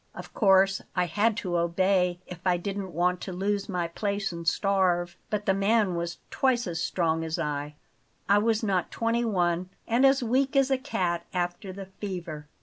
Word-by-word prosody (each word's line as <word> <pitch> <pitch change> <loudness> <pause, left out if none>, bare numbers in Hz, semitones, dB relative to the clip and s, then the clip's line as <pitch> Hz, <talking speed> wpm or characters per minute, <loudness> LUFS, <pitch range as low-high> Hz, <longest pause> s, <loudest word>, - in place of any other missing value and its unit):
Of - - -9
course 195 -2 +4
I 180 -1 +2
had 205 +6 +1
to 175 -1 0
obey 180 +1 +2
if 180 - -9
I 180 -2 +2
didn't 195 +1 -4
want 180 +1 +1
to 190 - -5
lose 200 +2 -1
my 180 -3 -1
place 200 +3 -2
and 170 -1 -7
starve; 180 -2 +1
but 210 -1 -2
the 195 - +3
man 200 0 +2
was 170 0 -3
twice 255 -2 +1
as 165 -2 -3
strong 165 -3 0
as 160 +1 -2
I 150 -2 -3 0.5
I 200 +1 +5
was 225 +1 +1
not 190 -4 0
twenty 230 +1 0
one 180 -4 0 0.2
and 235 +3 +2
as 270 -1 +5
weak 265 +4 +1
as 275 0 +3
a 265 - +4
cat 175 -10 -2
after 175 +2 -2
the 195 +1 -7
fever. 180 -6 -6
190 Hz, 185 wpm, -27 LUFS, 175-205 Hz, 0.5 s, I